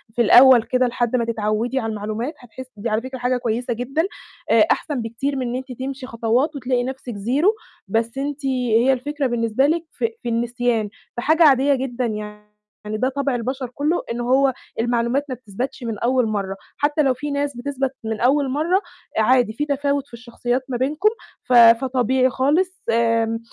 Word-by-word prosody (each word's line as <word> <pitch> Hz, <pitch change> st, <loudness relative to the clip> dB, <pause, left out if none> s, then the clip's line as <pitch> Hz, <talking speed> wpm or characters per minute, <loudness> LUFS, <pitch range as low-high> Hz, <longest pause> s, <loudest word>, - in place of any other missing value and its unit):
في 240 Hz, -, +2 dB
الأول 245 Hz, +1 st, +7 dB
كده 255 Hz, +1 st, +1 dB
لحد 240 Hz, 0 st, -1 dB
ما 235 Hz, -, +1 dB
تتعودي 230 Hz, +3 st, -1 dB
على 225 Hz, -, -3 dB
المعلومات 215 Hz, +6 st, -4 dB
هتحسي 255 Hz, +1 st, -11 dB
دي 225 Hz, +3 st, -3 dB
على 215 Hz, +1 st, 0 dB
فكرة 260 Hz, 0 st, -7 dB
حاجة 250 Hz, +1 st, +1 dB
كويسة 240 Hz, +1 st, -2 dB
جدًا، 250 Hz, +7 st, -1 dB, 0.5 s
آآ -, -, +5 dB
أحسن 285 Hz, -6 st, -1 dB
بكتير 235 Hz, +5 st, -3 dB
من 255 Hz, -2 st, -2 dB
إن 240 Hz, -, -3 dB
أنتِ 260 Hz, +1 st, -6 dB
تمشي 265 Hz, 0 st, -5 dB
خطوات 240 Hz, +6 st, 0 dB
وتلاقي 250 Hz, -2 st, -1 dB
نفْسِك 255 Hz, -3 st, -6 dB
زيرو، 275 Hz, -, +1 dB, 0.3 s
بس 230 Hz, +5 st, -1 dB
أنتِ 285 Hz, +1 st, -4 dB
هي 250 Hz, -1 st, +2 dB
الفكرة 285 Hz, +2 st, -2 dB
بالنسبة 235 Hz, +2 st, +1 dB
لِك 330 Hz, +2 st, 0 dB
في 460 Hz, -, -1 dB
في 240 Hz, -, -2 dB
النسيان، 235 Hz, -1 st, 0 dB, 0.3 s
فحاجة 315 Hz, +7 st, +3 dB
عادية 280 Hz, -1 st, +5 dB
جدًا 255 Hz, -1 st, -3 dB
يعني، 210 Hz, -1 st, -6 dB, 0.5 s
ده 255 Hz, +4 st, +1 dB
طَبْع 275 Hz, -1 st, -1 dB
البشر 255 Hz, +2 st, -3 dB
كله 305 Hz, +5 st, 0 dB
إن 235 Hz, -, -3 dB
هو 265 Hz, +2 st, +3 dB, 0.3 s
المعلومات 240 Hz, +4 st, 0 dB
ما 255 Hz, -, -3 dB
بتثبَتش 250 Hz, +3 st, -6 dB
من 225 Hz, -3 st, -4 dB
أول 250 Hz, -1 st, +2 dB
مرة، 200 Hz, -3 st, -2 dB, 0.2 s
حتى 295 Hz, +1 st, +1 dB
لو 270 Hz, -3 st, +3 dB
في 290 Hz, +3 st, -5 dB
ناس 285 Hz, -2 st, -2 dB
بتثبَت 270 Hz, 0 st, -3 dB
من 220 Hz, -1 st, -3 dB
أول 275 Hz, +3 st, +3 dB
مرة، 330 Hz, +8 st, +1 dB, 0.4 s
عادي 235 Hz, 0 st, +3 dB
في 295 Hz, +6 st, -2 dB
تفاوت 280 Hz, -1 st, -1 dB
في -, -, -29 dB
الشخصيات 240 Hz, +1 st, -3 dB
ما 250 Hz, -, -1 dB
بينكم، 300 Hz, -, +2 dB, 0.3 s
ف 250 Hz, -, -2 dB
فطبيعي 255 Hz, +2 st, +5 dB
خالص، 330 Hz, +9 st, 0 dB
آمم، 230 Hz, 0 st, +1 dB
250 Hz, 180 wpm, -21 LUFS, 230-275 Hz, 0.5 s, الأول